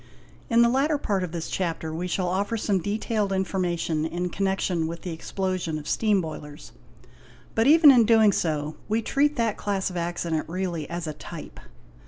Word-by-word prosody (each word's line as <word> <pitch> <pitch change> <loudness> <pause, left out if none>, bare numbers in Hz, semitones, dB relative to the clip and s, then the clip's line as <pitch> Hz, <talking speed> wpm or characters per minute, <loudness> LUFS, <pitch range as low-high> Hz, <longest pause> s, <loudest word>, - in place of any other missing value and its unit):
In 235 0 +5
the - - +5
latter 275 +5 +2
part 200 -9 -1
of 180 - -4
this 165 -1 -4
Chapter 165 -3 -3
we 175 +3 -3
shall 180 0 -1
offer 200 +5 -1
some 200 -3 0
detailed 210 +1 -1
infor 190 0 -1
mation 165 -3 -1
in 180 +1 -3
connection 190 -4 0
with 165 0 -7
the 180 - -4
explosion 180 -1 -3
of 150 -1 -8
steam 210 -3 +2
boilers, 150 -2 -8 0.8
but, 225 +2 +2
even 305 -1 +8
in 240 -4 +5
doing 220 -2 +6
so, 155 -4 -2
we 220 +2 +1
treat 290 +4 +1
that 230 -3 0
class 195 -2 -1
of 180 - -5
accident 170 -2 -2
really 175 -4 -3
as 170 0 -4
a 155 - -4
type. - - -9
185 Hz, 185 wpm, -25 LUFS, 165-215 Hz, 0.8 s, even